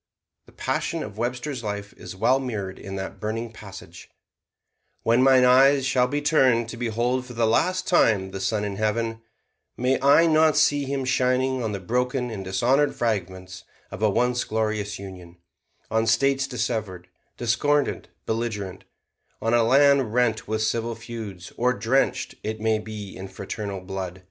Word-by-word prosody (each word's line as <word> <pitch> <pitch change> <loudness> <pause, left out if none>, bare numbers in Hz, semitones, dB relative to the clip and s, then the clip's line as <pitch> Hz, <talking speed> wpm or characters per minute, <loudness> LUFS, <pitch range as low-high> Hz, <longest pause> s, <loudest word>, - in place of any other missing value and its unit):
The - - -17
passion - - -2
of 105 +2 -9
Webster's 125 +2 -3
life 105 -1 -5
is - - -10
well 125 +7 +3
mirrored 105 -8 -5
in 95 0 -7
that 95 0 -6
burning 115 +2 -3
passage: 95 -5 -12 0.9
"When 115 +2 +3
mine 130 -1 +6
eyes 135 +2 +5
shall 130 -2 +2
be 145 +3 -2
turned 130 -7 +3
to 115 - -6
behold 120 +2 -1
for 125 - -9
the 115 -1 +1
last 180 +11 +1
time 105 - +3
the 95 - -6
sun 105 0 0
in 100 -1 -4
heaven, 115 +1 -1 0.6
may 130 +2 +1
I 140 +4 +6
not 155 -1 +4
see 145 -1 +3
him 135 -1 -2
shining 130 +1 +1
on 110 - -2
the 100 - -4
broken 125 +5 -1
and 100 -3 -5
dishonored 130 +10 +1
fragments 95 -5 -3 0.3
of - - -8
a 110 - +4
once 125 +4 +1
glorious 110 -2 -2
Union: 90 -3 -11 0.5
on 110 +1 +1
States 135 +3 +2
dissevered, 110 -7 -3 0.3
discordant, 140 +5 0 0.2
belligerent: 105 -5 -3 0.5
on 115 +1 0
a 120 - +5
land 135 -1 +4
rent 115 -4 +1
with 110 +1 -1
civil 115 +1 -1
feuds, 105 -8 -8
or 125 +1 +2
drenched, 130 +3 0
it 110 0 -4
may 110 0 +1
be, 105 -2 -8
in 95 +1 -7
fraternal 100 +1 -6
blood. 95 -1 -6
115 Hz, 160 wpm, -24 LUFS, 105-130 Hz, 0.9 s, mine